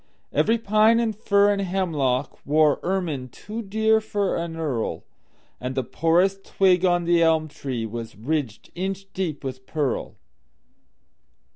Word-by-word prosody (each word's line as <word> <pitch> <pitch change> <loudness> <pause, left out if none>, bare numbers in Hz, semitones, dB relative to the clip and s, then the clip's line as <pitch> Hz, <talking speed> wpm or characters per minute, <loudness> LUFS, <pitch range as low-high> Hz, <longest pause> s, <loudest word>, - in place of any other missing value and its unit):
Every 225 +1 +3
pine 220 +1 +4
and 225 -2 0
fir 205 -1 +3
and 200 - -2
hemlockWore 155 -4 +1
ermine 170 -9 -2
too 215 - -7
dear 220 +1 +2
for 205 -2 -1
an 170 -1 -3
earl, 140 -9 -2 0.6
And 125 +1 -4
the 130 - 0
poorest 180 +8 +1
twig 185 -2 +3
on 175 -1 +3
the 170 0 +3
elm 160 -1 +3
treeWas 115 -5 -5
ridged 130 -3 -3
inch 195 +2 -4
deep 170 -7 -3
with 130 -1 -6
pearl. 145 -5 -2
170 Hz, 130 wpm, -24 LUFS, 140-195 Hz, 0.6 s, pine